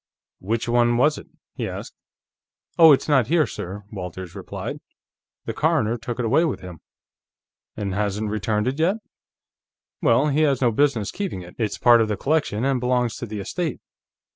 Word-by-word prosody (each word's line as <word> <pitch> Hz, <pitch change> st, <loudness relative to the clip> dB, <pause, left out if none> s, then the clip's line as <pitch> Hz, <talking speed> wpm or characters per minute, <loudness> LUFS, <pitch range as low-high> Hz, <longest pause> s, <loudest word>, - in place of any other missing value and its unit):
"Which 110 Hz, +5 st, -2 dB
one 120 Hz, 0 st, +3 dB
was 150 Hz, +4 st, +3 dB
it?" -, -, -13 dB, 0.3 s
he -, -, -4 dB
asked. -, -, -7 dB, 0.9 s
"Oh 165 Hz, -2 st, +10 dB
it's 140 Hz, -, +3 dB
not 135 Hz, -7 st, +3 dB
here, 160 Hz, +1 st, +3 dB
sir," 100 Hz, +3 st, -7 dB
Walters 90 Hz, -3 st, -7 dB
replied. -, -, -6 dB, 0.7 s
"The -, -, -3 dB
coroner 110 Hz, +2 st, +1 dB
took 120 Hz, 0 st, -5 dB
it 125 Hz, -, -1 dB
away 140 Hz, +9 st, +3 dB
with 160 Hz, -6 st, -2 dB
him." 90 Hz, -3 st, -9 dB, 1.0 s
"And 100 Hz, -3 st, -3 dB
hasn't 105 Hz, +1 st, -1 dB
returned 105 Hz, +1 st, -1 dB
it 135 Hz, +4 st, -2 dB
yet? 175 Hz, +5 st, +3 dB, 1.1 s
Well, 130 Hz, +6 st, +3 dB
he 145 Hz, +2 st, +1 dB
has 140 Hz, -4 st, +3 dB
no 120 Hz, -3 st, +3 dB
business 120 Hz, -4 st, +1 dB
keeping 190 Hz, -, -4 dB
it. 90 Hz, -, -12 dB
It's 110 Hz, -3 st, -1 dB
part 120 Hz, -1 st, +6 dB
of 110 Hz, -, +2 dB
the 105 Hz, -1 st, -2 dB
collection, 135 Hz, -6 st, 0 dB
and 135 Hz, -2 st, +1 dB
belongs 125 Hz, -2 st, 0 dB
to 120 Hz, -, -6 dB
the 105 Hz, -1 st, -5 dB
estate." 160 Hz, -, -3 dB
120 Hz, 175 wpm, -23 LUFS, 105-140 Hz, 1.1 s, Oh